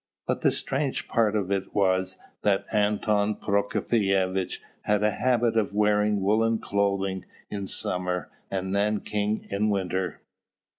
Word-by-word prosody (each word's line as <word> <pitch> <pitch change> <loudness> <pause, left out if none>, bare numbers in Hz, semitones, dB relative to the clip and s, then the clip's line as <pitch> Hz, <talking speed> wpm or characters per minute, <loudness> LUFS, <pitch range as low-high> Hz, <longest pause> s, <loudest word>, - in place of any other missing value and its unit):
But - - -1
the - - +4
strange - - -1
part 110 -2 +2
of 100 -2 -1
it 95 -1 -2
was 95 -1 +1 0.2
that 100 -2 +2
Anton 105 0 +2
Prokofievitch 100 -2 0 0.2
had 105 0 +1
a 105 - +3
habit 120 0 +1
of 105 -2 0
wearing 105 -1 +2
woollen 110 +3 +2
clothing 100 -2 -1 0.3
in 100 -2 -4
summer 90 -3 -1 0.2
and 95 -1 -2
nankeen 105 +1 0
in 105 +2 +1
winter. 95 -2 -2
100 Hz, 130 wpm, -26 LUFS, 95-105 Hz, 0.3 s, the